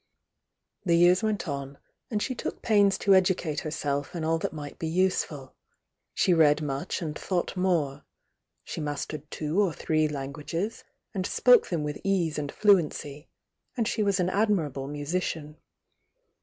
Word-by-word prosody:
The 170 -3 +3
years 175 +2 +5
went 215 -4 -1
on, 140 -1 -5 0.3
and 210 -3 -1
she 255 - -2
took - - -5
pains 205 -3 +4
to 195 - +3
educate 180 -5 +2
herself 145 -1 -3
in 165 - -3
all 165 +1 +1
that - - -2
nu^t 145 -2 -8
be 160 - -2
useful,— 160 -6 0 0.6
she 180 - +3
read 155 -3 +5
much 145 +3 -3
and 150 -2 -4
thought 180 +2 -2
more, 160 -7 0 0.6
—she - - -6
mastered 150 0 -4
two 155 +6 0
or 195 -4 +2
three 155 0 +1
languages, 150 +8 -4 0.3
and 185 -3 -2
spoke 250 -1 +5
them 165 -4 -1
with 150 0 -4
pose 175 -6 0
and 145 -1 -4
fluency, 160 -7 +1 0.5
and 230 -3 +1
she 230 - -1
was 200 -2 +2
an 180 0 +2
admir 200 -7 +1
aWe 135 +1 -6
musician. 150 0 -3
165 Hz, 155 wpm, -27 LUFS, 150-190 Hz, 0.6 s, years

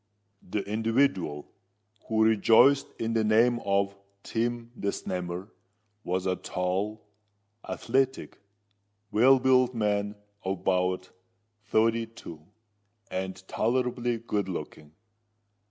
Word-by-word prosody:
The 100 +2 -3
individual 110 - 0 0.6
who 110 -1 +2
rejoiced 115 +5 +5
in 115 0 -2
the 110 -1 +2
name 115 +3 +4
of 100 0 +1 0.3
Tim 120 0 -2
the 100 - -4
Snammer, 90 0 -4 0.5
was 90 +1 -2
a 95 -1 +1
tall, 95 +4 -2 0.6
athletic, 130 +2 -1 0.7
well 130 +5 +6
built 130 -1 +3
man 105 -1 0 0.3
of 95 -1 -3
about 90 0 0 0.5
thirty 115 +1 +2
two, 85 -8 -11 0.7
and 95 0 -5
tolerably 120 0 0
good 105 -4 -2
looking. 75 -3 -7
110 Hz, 100 wpm, -28 LUFS, 95-120 Hz, 0.7 s, well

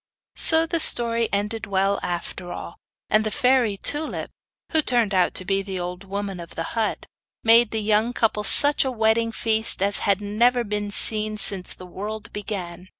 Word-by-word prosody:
So 320 0 +7
the 335 0 -3
story 235 -5 +6
ended 210 +2 -4
well 195 0 -1
after 175 +1 -6
all; 170 - -9 0.3
and 215 +1 +2
the 215 - -3
fairy 250 -3 0
Tulip, 295 +9 -2 0.4
who 315 - +1
turned 240 -7 +1
out 185 -2 0
to 185 - -4
be 195 +1 -1
the 190 -1 -7
old 180 +2 -7
woman 195 -1 -6
of 170 -1 -12
the 165 - -4
hut, 225 -2 -3 0.4
made 230 0 +4
the 220 -1 -4
young 215 +2 0
couple 220 -3 -2
such 290 +7 +5
a 265 - -3
wedding 225 -1 0
feast 220 0 0
as 200 +1 0
had 200 -1 0
never 235 +4 0
been 210 -1 -5
seen 215 +1 -1
since 195 -3 +2
the 185 - -13
world 215 +5 -9
began. 185 -4 -7
210 Hz, 180 wpm, -21 LUFS, 195-230 Hz, 0.4 s, So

